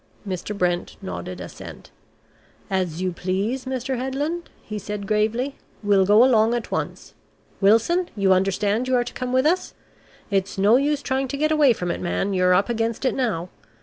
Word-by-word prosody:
Mr. 195 Hz, +2 st, -4 dB
Brent 175 Hz, -2 st, -1 dB
nodded 90 Hz, 0 st, -6 dB
assent. 90 Hz, -, -10 dB, 0.8 s
"As 185 Hz, -2 st, -1 dB
you 185 Hz, -, 0 dB
please, 195 Hz, +9 st, -2 dB
Mr. 260 Hz, 0 st, -2 dB
Headland," 290 Hz, +7 st, -3 dB
he 210 Hz, -1 st, -5 dB
said 205 Hz, 0 st, -5 dB
gravely. 220 Hz, +6 st, 0 dB, 0.3 s
"We'll 200 Hz, -2 st, +3 dB
go 210 Hz, +3 st, +7 dB
along 235 Hz, -2 st, +4 dB
at 240 Hz, -, -4 dB
once. -, -, -4 dB, 0.5 s
Wilson, 230 Hz, -, +3 dB
you 195 Hz, -2 st, +4 dB
understand 200 Hz, +5 st, +1 dB
you 260 Hz, -, +2 dB
are 245 Hz, -, +3 dB
to 240 Hz, -, -8 dB
come 255 Hz, -1 st, -4 dB
with 260 Hz, +2 st, +2 dB
us? 355 Hz, +4 st, +1 dB, 0.6 s
It's 195 Hz, 0 st, 0 dB
no 205 Hz, +4 st, +5 dB
use 285 Hz, +1 st, 0 dB
trying 265 Hz, +2 st, -1 dB
to 280 Hz, -, -4 dB
get 310 Hz, +2 st, +1 dB
away 295 Hz, -5 st, +5 dB
from 180 Hz, -5 st, -3 dB
it, -, -, -4 dB
man, 195 Hz, +3 st, -1 dB
you're 180 Hz, -1 st, +4 dB
up 195 Hz, -, +2 dB
against 230 Hz, +1 st, -1 dB
it 260 Hz, -, +2 dB
now. 200 Hz, -10 st, -1 dB
215 Hz, 180 wpm, -23 LUFS, 190-260 Hz, 0.8 s, go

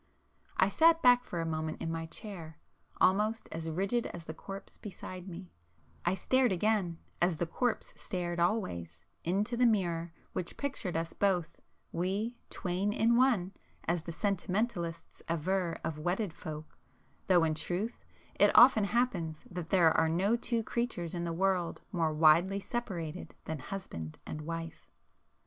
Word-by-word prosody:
I 190 Hz, -, +5 dB
sat 325 Hz, +9 st, +5 dB
back 245 Hz, -1 st, +7 dB
for 175 Hz, -8 st, -3 dB
a -, -, -2 dB
moment 155 Hz, -1 st, -2 dB
in 165 Hz, -, -2 dB
my 165 Hz, 0 st, -3 dB
chair, 165 Hz, -4 st, -8 dB, 0.4 s
almost 215 Hz, +4 st, +3 dB
as 165 Hz, 0 st, -4 dB
rigid 195 Hz, +8 st, 0 dB
as 170 Hz, -2 st, -8 dB
the 160 Hz, -, -5 dB
corpse 195 Hz, +4 st, -9 dB
beside 185 Hz, -2 st, -8 dB
me,—I 85 Hz, -, -6 dB
stared 255 Hz, +5 st, +3 dB
again, 190 Hz, -2 st, +1 dB, 0.2 s
as 175 Hz, -2 st, +3 dB
the 175 Hz, -, 0 dB
corpse 240 Hz, +8 st, -1 dB
stared 175 Hz, -2 st, -3 dB
always, 85 Hz, -, -1 dB, 0.2 s
into 200 Hz, +7 st, 0 dB
the 245 Hz, +1 st, +5 dB
mirror 175 Hz, -6 st, +1 dB, 0.2 s
which 175 Hz, -, -3 dB
pictured 245 Hz, -, -2 dB
us 165 Hz, 0 st, -3 dB
both, 180 Hz, -4 st, 0 dB, 0.3 s
we 200 Hz, +7 st, -1 dB
'twain 185 Hz, +3 st, -1 dB
in 230 Hz, +2 st, +3 dB
one,' 235 Hz, -8 st, +3 dB, 0.3 s
as 170 Hz, 0 st, 0 dB
the 170 Hz, -, -6 dB
sentimentalists 185 Hz, -2 st, -2 dB
aver 170 Hz, +2 st, 0 dB
of 155 Hz, -1 st, -3 dB
wedded 180 Hz, +3 st, -1 dB
folk, 155 Hz, -1 st, -8 dB, 0.5 s
though 180 Hz, -3 st, +5 dB
in 160 Hz, -1 st, +2 dB
truth 180 Hz, +8 st, -3 dB, 0.4 s
it -, -, +7 dB
often 240 Hz, -4 st, +8 dB
happens 195 Hz, -9 st, 0 dB
that 175 Hz, -2 st, -5 dB
there 170 Hz, -4 st, +5 dB
are 160 Hz, -, +4 dB
no 190 Hz, +7 st, +2 dB
two 235 Hz, -1 st, 0 dB
creatures 225 Hz, -9 st, -2 dB
in 175 Hz, -1 st, -2 dB
the 170 Hz, -, -2 dB
world 180 Hz, 0 st, +1 dB
more 165 Hz, -5 st, +1 dB
widely 165 Hz, +5 st, +5 dB
separated 185 Hz, -6 st, -4 dB
than 160 Hz, -1 st, -3 dB
husband 105 Hz, -, -6 dB
and 155 Hz, -, -5 dB
wife. 165 Hz, +1 st, -6 dB
180 Hz, 150 wpm, -32 LUFS, 165-205 Hz, 0.5 s, often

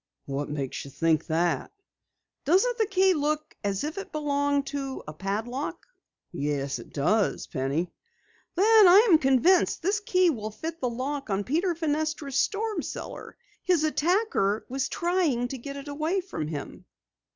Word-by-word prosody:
"What 140 Hz, +1 st, -3 dB
makes 140 Hz, -3 st, -4 dB
you 140 Hz, -, -9 dB
think 160 Hz, +2 st, +1 dB
that?" 170 Hz, +1 st, 0 dB, 0.7 s
"Doesn't 405 Hz, -, +2 dB
the 440 Hz, -, +2 dB
key 380 Hz, 0 st, +3 dB
look 305 Hz, -1 st, -2 dB
as 200 Hz, +2 st, -1 dB
if 310 Hz, +6 st, -3 dB
it -, -, -8 dB
belonged 285 Hz, -2 st, 0 dB
to 270 Hz, -2 st, -4 dB
a 150 Hz, -, -6 dB
padlock?" 225 Hz, -, -4 dB, 0.5 s
"Yes, 140 Hz, -4 st, -2 dB
it -, -, -12 dB
does, 205 Hz, +9 st, +1 dB
Penny." 145 Hz, +5 st, -2 dB, 0.6 s
"Then 425 Hz, +2 st, +7 dB
I 400 Hz, +6 st, +7 dB
am 320 Hz, -, +7 dB
convinced 320 Hz, +8 st, +3 dB
this 400 Hz, +4 st, +1 dB
key 370 Hz, -3 st, +3 dB
will 215 Hz, -6 st, -4 dB
fit 325 Hz, +9 st, -7 dB
the 250 Hz, -, +1 dB
lock 270 Hz, +3 st, -4 dB
on 195 Hz, 0 st, 0 dB
Peter 335 Hz, -, 0 dB
Fenestra's 310 Hz, -3 st, -2 dB
storm 425 Hz, +4 st, 0 dB
cellar! -, -, -7 dB, 0.2 s
His 355 Hz, -4 st, +2 dB
attacker 310 Hz, -, +1 dB
was 265 Hz, +1 st, -2 dB
trying 335 Hz, -9 st, 0 dB
to 265 Hz, -, -5 dB
get 280 Hz, +3 st, -7 dB
it 280 Hz, +1 st, -8 dB
away 310 Hz, +6 st, -1 dB
from 350 Hz, -, -5 dB
him!" 150 Hz, -2 st, -7 dB
285 Hz, 155 wpm, -27 LUFS, -, 0.7 s, Then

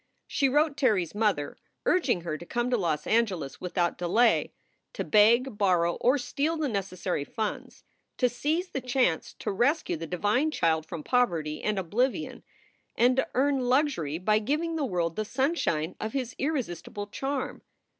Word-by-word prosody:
She 275 Hz, -2 st, +1 dB
wrote 295 Hz, +1 st, +2 dB
Terry 225 Hz, -10 st, +3 dB
s 170 Hz, -, -10 dB
mother, 205 Hz, -9 st, 0 dB, 0.3 s
urging 275 Hz, -, +2 dB
her 165 Hz, -2 st, -3 dB
to 155 Hz, -, -8 dB
come 240 Hz, +7 st, -2 dB
to -, -, +4 dB
Los 160 Hz, -6 st, -1 dB
Angeles 195 Hz, -11 st, 0 dB
without 175 Hz, -1 st, -1 dB
delay; 220 Hz, +7 st, +3 dB, 0.4 s
to -, -, -3 dB
beg, 225 Hz, +2 st, +4 dB
borrow, 175 Hz, -4 st, +3 dB
or 255 Hz, +4 st, +3 dB
steal 290 Hz, +5 st, -1 dB
the 310 Hz, -2 st, 0 dB
necessary 190 Hz, -, -2 dB
funds; 215 Hz, +8 st, -5 dB, 0.3 s
to 250 Hz, -, +3 dB
seize 310 Hz, +9 st, -1 dB
the 270 Hz, -, -4 dB
chance 250 Hz, -9 st, 0 dB
to -, -, -3 dB
rescue 245 Hz, -, +1 dB
the 165 Hz, +1 st, -6 dB
divine 205 Hz, -, +1 dB
child 160 Hz, -, 0 dB
from 165 Hz, -2 st, -6 dB
poverty 165 Hz, -12 st, 0 dB
and 210 Hz, -1 st, -1 dB
oblivion, 245 Hz, -, -1 dB, 0.5 s
and 250 Hz, +2 st, +3 dB
to 265 Hz, -, +2 dB
earn 275 Hz, +1 st, +2 dB
luxury 255 Hz, -, +1 dB
by 210 Hz, +4 st, +2 dB
giving 305 Hz, +9 st, -1 dB
the 305 Hz, -3 st, 0 dB
world 170 Hz, -6 st, -1 dB
the 215 Hz, -, -1 dB
sunshine 230 Hz, -, -1 dB
of 220 Hz, 0 st, -4 dB
his 255 Hz, -3 st, -3 dB
irresistible 235 Hz, -, -3 dB
charm. 270 Hz, +6 st, -4 dB
220 Hz, 165 wpm, -28 LUFS, 175-270 Hz, 0.5 s, to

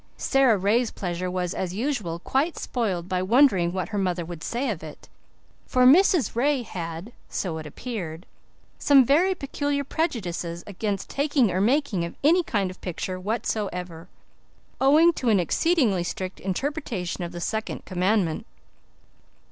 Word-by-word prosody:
Sara 265 Hz, -5 st, +3 dB
Ray's 215 Hz, +5 st, +2 dB
pleasure 180 Hz, -1 st, -4 dB
was, 180 Hz, -1 st, -2 dB
as 185 Hz, -1 st, -3 dB
usual, 215 Hz, -, -2 dB
quite 275 Hz, -, -1 dB
spoiled 190 Hz, -8 st, -2 dB
by 185 Hz, -1 st, -1 dB
wondering 195 Hz, -4 st, +4 dB
what 185 Hz, 0 st, -3 dB
her 205 Hz, -, -2 dB
mother 180 Hz, -3 st, -1 dB
would 170 Hz, -1 st, -8 dB
say 245 Hz, +4 st, -2 dB
of 180 Hz, -, -5 dB
it, 155 Hz, -1 st, -11 dB, 0.6 s
for 255 Hz, -1 st, +3 dB
Mrs. 330 Hz, +1 st, +5 dB
Ray 270 Hz, +1 st, +1 dB
had, 170 Hz, 0 st, -6 dB, 0.2 s
so 165 Hz, -4 st, -3 dB
it 155 Hz, -, -7 dB
appeared, 175 Hz, -, -6 dB, 0.5 s
some 275 Hz, -3 st, +6 dB
very 350 Hz, +9 st, +3 dB
peculiar 285 Hz, -1 st, -2 dB
prejudices 180 Hz, -, -3 dB
against 200 Hz, 0 st, -3 dB
the -, -, -9 dB
taking 280 Hz, -6 st, +2 dB
or 185 Hz, +2 st, 0 dB
making 240 Hz, -, +1 dB
of 170 Hz, -, -5 dB
any 335 Hz, +5 st, +5 dB
kind 200 Hz, -, -1 dB
of 185 Hz, -, -15 dB
picture 185 Hz, +1 st, -4 dB
whatsoever, 185 Hz, -5 st, -3 dB, 0.7 s
owing 310 Hz, +6 st, +6 dB
to 255 Hz, -6 st, -1 dB
an 210 Hz, -3 st, +4 dB
exceedingly 220 Hz, -, +2 dB
strict 185 Hz, +1 st, -5 dB
interpretation 195 Hz, -, -3 dB
of 170 Hz, -, -5 dB
the 175 Hz, -, -7 dB
second 220 Hz, +5 st, -3 dB
commandment. 185 Hz, +1 st, 0 dB
205 Hz, 150 wpm, -25 LUFS, 180-270 Hz, 0.7 s, some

